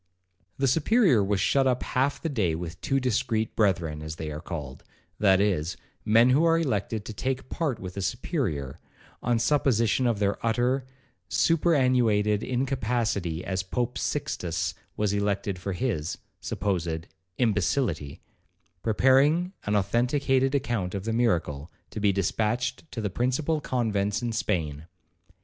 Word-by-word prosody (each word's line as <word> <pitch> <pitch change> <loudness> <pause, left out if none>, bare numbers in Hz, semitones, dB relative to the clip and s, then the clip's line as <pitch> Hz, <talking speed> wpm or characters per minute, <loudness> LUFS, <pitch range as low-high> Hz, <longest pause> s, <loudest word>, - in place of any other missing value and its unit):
The 135 - +1
Superior 160 - +4
was 100 0 0
shut 135 +7 +3
up 125 -1 +1
half 135 +3 0
the - - -3
day 105 - 0
with 80 0 -6
two 135 - +1
discreet 115 -3 0
brethren, 85 -7 +1
as 80 0 -6
they 80 -1 -5
are 75 +1 -6
called, 75 -7 -7 0.4
(that 95 -2 +5
is, 90 -5 0 0.3
men 115 +4 +5
who 145 +5 +4
are 165 0 +4
elected 110 -8 -1
to 110 - -6
take 130 +4 -3
part 150 -8 -1
with 90 -1 -7
the 100 - -4
Superior, 95 - -2 0.4
on 120 0 +1
supposition 125 -2 +2
of 115 -3 +1
their 100 0 -1
utter, 125 +3 +1 0.4
superannuated 125 - +3
incapacity, 120 -9 -1
as 95 -1 -1
Pope 120 +6 -2
Sixtus 90 - -2 0.2
was 105 -1 +1
elected 100 -2 -1
for 95 +1 -3
his 90 -7 -2 0.2
(supposed) 85 -5 -2 0.3
imbecillity), 105 - 0 0.6
preparing 140 - +3
an 105 - +1
authenticated 130 +6 +2
account 115 -9 -1
of 95 - -3
the 115 - -1
miracle, 85 -10 0 0.2
to - - -5
be 100 -1 +3
dispatched 110 - -1
to 115 - -4
the 105 -2 -2
principal 140 - 0
convents 105 -5 -1
in 120 - -1
Spain. 80 -8 -2
110 Hz, 140 wpm, -27 LUFS, 95-130 Hz, 0.6 s, that